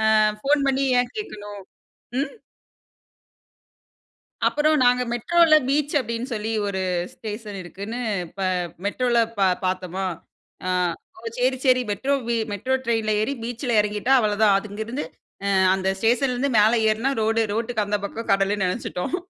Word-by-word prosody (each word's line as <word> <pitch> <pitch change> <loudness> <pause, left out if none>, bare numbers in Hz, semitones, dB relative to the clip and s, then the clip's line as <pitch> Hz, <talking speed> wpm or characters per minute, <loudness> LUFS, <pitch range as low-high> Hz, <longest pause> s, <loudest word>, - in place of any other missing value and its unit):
அ, - - +5 0.3
phone 280 0 +3
பண்ணி 270 0 +1 0.2
ஏன் 245 0 -1
கேக்கணும்? 205 - -7 0.6
ம். 285 - -2 2.1
அப்புறம் 305 +1 +3
நாங்க 250 0 +4
மெட்ரோல 330 +6 +4
பீச் 290 +1 +1
அப்டின்னு 235 +1 -4
சொல்லி 220 0 -2 0.2
ஒரு 190 -1 -2 0.3
ஸ்டேஷன் 210 -2 -7
இருக்குன்னு, 200 +7 -6 0.4
ப - - -4 0.4
மெட்ரோல 240 +3 +1 0.2
பார் 185 -2 +3
பார்த்தமா, 185 0 -2 0.6
அ, - - -1 0.5
ஓ! - - -13 0.2
சரி 255 +1 +1
சரி, 255 -1 +5
மெட்ரோ 270 +8 0 0.4
மெட்ரோ 255 +6 -1
ட்ரெயின்ல 225 -2 +1
ஏறி 275 +6 0
பீச்சில 240 0 -2
இறங்கிட்டா 210 +5 0
அவ்வளோதான். 210 -2 +3
அது 215 - -7
அங்கிருந்து 225 +6 -4 0.7
அந்த 190 0 -1
ஸ்டேஷன்ல 245 +4 +2
இருந்து 270 +3 0
மேல 215 +3 +5 0.2
ஏறுனா 225 +6 0
ரோடு 225 +1 +2
ரோட்டுக்கு 225 -1 -1
அந்த 205 0 0
பக்கம் 230 +1 -6
கடலுன்னு 195 0 +1
நெனச்சுட்டோம். 180 - -2
225 Hz, 135 wpm, -23 LUFS, 205-255 Hz, 2.1 s, அ